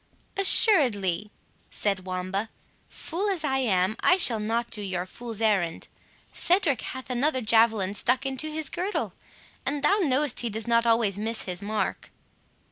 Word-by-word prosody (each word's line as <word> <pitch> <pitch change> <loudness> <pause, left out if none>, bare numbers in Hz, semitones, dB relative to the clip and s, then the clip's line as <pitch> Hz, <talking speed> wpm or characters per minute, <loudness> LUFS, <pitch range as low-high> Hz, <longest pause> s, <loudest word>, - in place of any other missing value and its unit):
"Assuredly," 220 - +5 0.4
said 195 -3 -2
Wamba, 185 +4 -3 0.4
"fool 380 +5 -4
as 365 -5 -2
I 265 -3 0
am, 195 -4 +1
I 360 - +4
shall 240 - +3
not 230 +3 -2
do 210 - -5
your 185 -3 -3
fool's 225 +3 -9
errand. 190 -7 0 0.5
Cedric 340 - +1
hath 260 0 -7
another 260 +2 0
javelin 220 -4 +2
stuck 250 +5 0
into 270 +3 -2
his 310 0 -4
girdle, 370 +4 -3 0.5
and 280 0 -3
thou 405 - +3
knowest 290 - 0
he 240 - -1
does 220 +2 -5
not 235 0 +2
always 225 -4 +2
miss 225 +2 -2
his 180 0 -5
mark." 215 +1 -3
230 Hz, 150 wpm, -26 LUFS, 205-285 Hz, 0.5 s, Assuredly